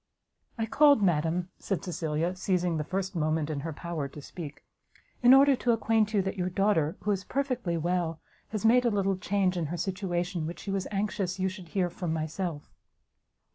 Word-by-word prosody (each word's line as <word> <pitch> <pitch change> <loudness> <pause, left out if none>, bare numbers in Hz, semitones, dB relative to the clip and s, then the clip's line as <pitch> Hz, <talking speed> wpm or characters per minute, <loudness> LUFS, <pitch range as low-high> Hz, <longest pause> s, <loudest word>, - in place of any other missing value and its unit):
"I 225 - 0
called, 285 0 +5
madam," 175 0 +1
said 195 - -2
Cecilia, 170 -1 -2
seizing 180 -3 0
the 150 - -1
first 190 +3 -3
moment 155 -1 0
in 145 - -2
her 160 +3 -4
power 160 -2 -4
to 140 - -11
speak, 150 0 -9 0.6
"in 245 0 +7
order 275 +1 +7
to 240 -1 +2
acquaint 220 -1 +2
you 205 -3 +2
that 195 +1 -3
your 180 0 0
daughter, 185 -4 +1
who 210 - 0
is 195 -2 -1
perfectly 250 -11 -1
well, 170 -1 -1 0.3
has 215 0 -4
made 245 +2 +6
a 240 - +3
little 195 -2 +1
change 185 -1 0
in 165 -3 -1
her 175 +4 -4
situation, 180 -2 -2
which 170 - -7
she 200 - -4
was 195 -1 -1
anxious 195 -2 -2
you 190 0 +1
should 185 -2 -9
hear 180 -1 0
from 175 -3 -3
myself." 160 0 -4
185 Hz, 190 wpm, -29 LUFS, 165-205 Hz, 0.6 s, in